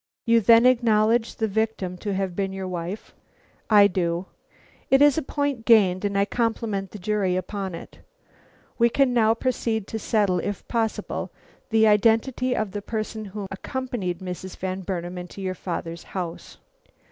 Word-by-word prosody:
"You 230 -1 +4
then 230 +2 +6
acknowledge 230 -2 +3
the 220 - 0
victim 210 -3 -1
to 205 0 -3
have 190 -2 -2
been 195 0 -1
your 190 -1 -5
wife?" 180 +3 -5 0.6
"I 205 -2 +7
do." 175 -2 0 0.6
"It 270 - +5
is 290 -1 +6
a 320 - 0
point 285 -4 -2
gained, 200 -6 +4
and 200 -1 0
I 200 - +3
compliment 225 -4 -2
the 210 - -9
jury 200 -2 0
upon 190 0 -4
it. 165 - -11 0.8
We 235 0 +5
can 265 +1 +2
now 225 -2 +4
proceed 230 -4 -1
to 220 - -3
settle, 205 -4 +1
if 205 +1 -4
possible, 225 -2 -2 0.4
the 220 -1 +4
identity 230 +4 +3
of 215 -4 -2
the 205 +1 -4
person 215 0 -4
who 200 0 -6
accompanied 195 -4 -4
Mrs. 185 0 -6
Van 185 0 -3
Burnam 180 -1 -4
into 180 +2 -9
your 190 -1 -2
father's 170 -2 -5 0.2
house." 175 -2 -6
210 Hz, 160 wpm, -24 LUFS, 185-230 Hz, 0.8 s, I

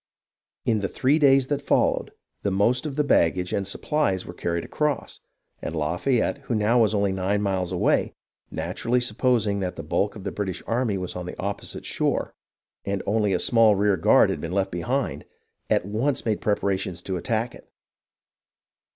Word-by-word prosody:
In 110 -2 +2
the 100 - -1
three 140 +9 +2
days 135 -2 +5
that 145 +1 -2
followed, - - +1 0.3
the 100 - 0
most 115 +9 +2
of 140 - -5
the 150 - +2
baggage 90 - +2
and 100 -1 -1
supplies 100 - 0
were 90 - -8
carried 85 -1 -2
across, 150 -2 -2 0.4
and 80 - -4
Lafayette, 90 - 0
who 120 - -1
now 110 +3 +3
was 110 -1 +3
only 100 -1 +2
nine 95 +2 0
miles 95 -3 -1
away, 90 - +1 0.3
naturally 125 +2 -1
supposing 115 -3 +1
that 90 -2 -3
the 80 - -6
bulk 100 +8 0
of 105 - -9
the - - -3
British 95 -4 -4
army 115 -3 0
was 90 -1 -4
on 90 -1 -5
the - - -7
opposite 100 +1 -5
shore - - -1 0.5
and 100 -1 -2
only 105 -1 +1
a 90 - +2
small 115 +1 +4
rear 100 0 +3
guard 80 - +4
had - - -4
been 85 - -4
left 95 0 0
behind, 120 +10 -2 0.5
at - - +2
once 115 +7 -1
made 110 -2 0
preparations 95 -4 -1
to 95 - -3
attack 110 +7 -1
it. - - -16
100 Hz, 175 wpm, -25 LUFS, 95-120 Hz, 0.5 s, days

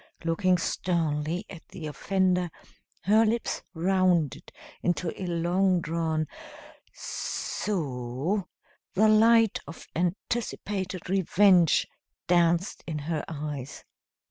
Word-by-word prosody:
Looking 180 +2 +2
sternly 165 0 -1
at 170 -4 -12
the 165 - -8
offender, 180 +3 0 0.5
her 215 +5 +5
lips 225 +1 0
rounded 180 -3 +1 0.3
into 175 -1 0
a 185 - -3
long 175 +2 +2
drawn 160 -1 -1 0.7
"s - - -4
o," 150 - -2 0.5
the 215 +3 +5
light 225 0 +5
of 165 - -10
anticipated 190 +1 -2
revenge 185 -2 +4 0.4
danced 175 +1 +2
in 160 -2 -3
her 150 +1 -3
eyes. 145 -4 -6
175 Hz, 95 wpm, -27 LUFS, 160-190 Hz, 0.7 s, her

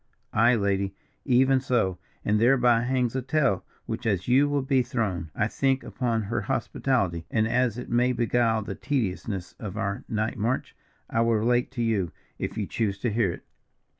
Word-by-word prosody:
"Aye, 120 +3 +5
lady, 100 -2 0 0.3
even 130 0 +4
so! 115 -9 0 0.3
and 105 +1 +2
thereby 120 -1 +4
hangs 125 -1 0
a 130 - 0
tale, 135 - +1 0.2
which, 120 - -4
as 95 -4 0
you 135 +4 +4
will 145 -1 0
be 135 -1 +3
thrown, 110 - -2
I 105 - +1
think, 135 +3 0
upon 115 -4 -1
her 105 +4 -2
hospitality, 95 -11 -1
and 110 0 +1
as 120 -1 +1
it 125 - -6
may 125 +1 +3
beguile 115 -2 +1
the - - -5
tediousness 95 -7 -2
of 105 -6 -6
our 100 +1 -2
night 110 -1 -1
march, 120 +5 -1 0.3
I 115 - 0
will 115 0 +3
relate 120 +3 +2
to 120 -3 -1
you, 100 -7 0 0.3
if - - -4
you - - -1
choose 105 -4 -1
to 120 - 0
hear 110 -5 +2
it." - - -9
115 Hz, 180 wpm, -26 LUFS, 105-125 Hz, 0.3 s, Aye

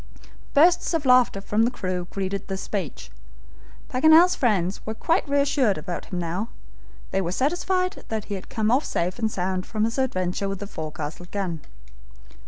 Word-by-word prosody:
Bursts 340 +3 +5
of 310 -3 -1
laughter 250 -5 +5
from 210 +2 0
the 230 - +4
crew 185 -7 -3
greeted 195 0 -3
this 195 0 -4
speech. 185 - -5 0.8
Paganel's 315 +7 +6
friends 195 -6 0
were 220 - -4
quite 330 - 0
reassured 280 -6 +2
about 170 +3 -5
him 180 - -5
now. 175 +6 -2 0.6
They 195 - +1
were 175 -2 -2
satisfied 365 - 0
that 220 -2 -3
he 205 - -5
had 190 - -6
come 220 0 0
off 265 +5 +3
safe 180 +5 -2
and 220 -1 +1
sound 185 -1 -2
from 215 -1 -1
his 230 +4 0
adventure 190 -6 -1
with 195 - -3
the 205 - -6
forecastle 160 -1 -6
gun. 180 -6 -3
205 Hz, 170 wpm, -24 LUFS, 185-260 Hz, 0.8 s, Paganel's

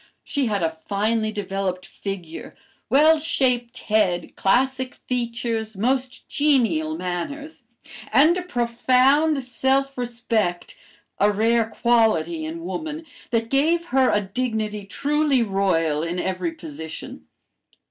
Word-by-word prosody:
She 280 -4 -1
had 205 -4 -1
a 160 0 -2
finely 215 +2 0
developed 195 -3 -3
figure, 180 -5 -7 0.3
well 310 +3 +5
shaped 255 -6 0
head, 205 -5 +1
classic 260 +5 +1
features, 230 -3 -3
most 255 +4 -1
genial 300 +2 +1
manners, 285 - -5 0.5
and 310 +5 +5
a 365 - -2
profound 265 +1 +2
self 265 +2 0
respect 230 -7 -2 0.4
(a 205 +1 +4
rare 225 +2 +2
quality 215 -10 +2
in 165 +1 -6
woman), 310 - -5 0.2
that 230 -1 -1
gave 325 +5 +2
her 265 -1 +4
a 210 - +2
dignity 215 -1 -3
truly 285 +3 +1
royal 185 -7 +1
in 170 +2 -3
every 185 -2 -2
position. 160 -1 -9
230 Hz, 115 wpm, -23 LUFS, 195-270 Hz, 0.5 s, well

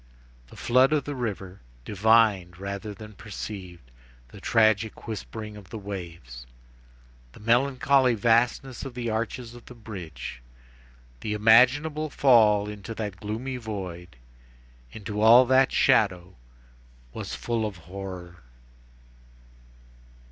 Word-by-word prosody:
The - - -15
flood 130 +4 +3
in 150 - +2
the 145 - -6
river, 100 -7 -5 0.2
divined 105 -4 +3
rather 100 +2 -5
than 105 +1 -11
perceived, 95 - -9 0.4
the - - -13
tragic 110 -1 +1
whispering 110 0 -6
of 100 -3 -13
the 110 - -7
waves, 85 - -8 0.9
the - - -15
melancholy 130 +2 +3
vastness 120 +4 +1
of 135 -3 -8
the 120 -2 -3
arches 115 +2 -4
of 120 -1 -14
the 125 - -11
bridge, 85 - -8 0.8
the 105 +7 -3
imaginable 130 +8 +4
fall 110 -7 +4
into 105 +2 -7
that 105 -3 -5
gloomy 115 +5 -4
void, 90 - -7 0.8
into 105 -1 -5
all 120 +3 +8
that 130 +1 +4
shadow 90 -3 +2 0.8
was - - -6
full 115 -2 -2
of 105 -4 -4
horror. 90 -1 -8
110 Hz, 115 wpm, -26 LUFS, 95-120 Hz, 0.9 s, all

